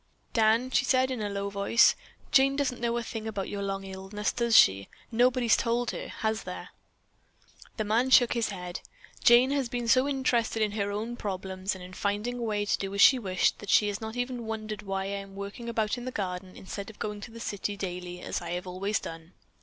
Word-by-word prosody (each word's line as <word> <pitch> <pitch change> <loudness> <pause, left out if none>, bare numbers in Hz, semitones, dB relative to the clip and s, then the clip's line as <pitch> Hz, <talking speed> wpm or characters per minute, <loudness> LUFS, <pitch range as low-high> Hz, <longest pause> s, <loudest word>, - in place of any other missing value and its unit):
"Dan," 225 +3 +3
she - - +3
said 260 0 +2
in 250 -4 -3
a 205 - -2
low 200 0 -3
voice, 200 +5 +4 0.4
"Jane 275 0 +5
doesn't 265 -4 -1
know 235 0 0
a 240 - -2
thing 225 -1 -5
about 205 -3 -3
your 200 - -4
long 195 0 -3
illness, 195 +2 -3
does 235 -2 +3
she? 95 +1 +5 0.2
Nobody's 240 0 +4
told 240 0 0
her, - - -6
has 220 0 -2
there?" - - -7 1.1
The 215 - 0
man 225 +5 +1
shook 245 -2 +6
his 235 -2 0
head. 180 -3 -6 0.4
"Jane 245 +3 +6
has 275 -4 0
been 240 -1 -3
so 255 +3 +4
interested 240 -5 +1
in 210 - 0
her 205 -1 -1
own 220 +4 -4
problems, 190 -1 -3
and 185 - -10
in 180 +1 -10
finding 210 +6 -2
a - - -5
way 210 -3 -1
to - - +1
do 195 0 -4
as 200 - +2
she 260 - +8
wished, 190 -5 +1
that 205 - -9
she 210 - +5
has 200 +1 -4
not 220 +1 -5
even 245 -2 -3
wondered 215 -2 -4
why 195 -1 -3
I - - -4
am 195 0 -11
working 200 +4 -6
about 225 +1 -1
in 240 - -8
the 255 - -3
garden 185 -3 -4
instead 195 +2 -7
of 220 - -13
going 210 -1 -4
to 220 - -8
the 230 0 -11
city 205 -2 -3
daily, 180 -2 -5
as - - -3
I 175 - -3
always 185 +3 -2
have - - -7
done. 165 +1 -9
215 Hz, 225 wpm, -28 LUFS, 195-240 Hz, 1.1 s, she